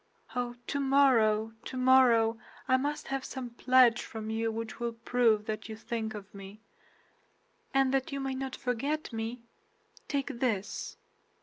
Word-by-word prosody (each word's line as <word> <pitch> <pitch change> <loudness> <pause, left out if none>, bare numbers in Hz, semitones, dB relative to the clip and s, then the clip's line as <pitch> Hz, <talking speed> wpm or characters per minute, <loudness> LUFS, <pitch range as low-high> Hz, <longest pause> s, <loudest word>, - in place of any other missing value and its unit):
Oh, 245 -1 -2
tomorrow, 255 -6 +3
tomorrow, 255 -3 +4 0.3
I 260 - +4
must 290 +3 -2
have 270 -1 -2
some 255 -3 -6
pledge 245 -1 +4
from 220 -1 -6
you 225 0 0
which 225 +1 -5
will 235 -1 -2
prove 230 -2 +2
that 215 0 -4
you 220 - -5
think 220 -1 -4
of 200 -1 -10
me; 200 +1 -10 1.1
and 270 -1 +2
that 270 +3 0
you 275 - -3
may 270 -1 -2
not 260 0 -4
forget 275 +4 -2
me, 225 +2 -4 0.6
take 280 -3 -2
this!" 215 -6 -2
240 Hz, 140 wpm, -30 LUFS, 225-265 Hz, 1.1 s, tomorrow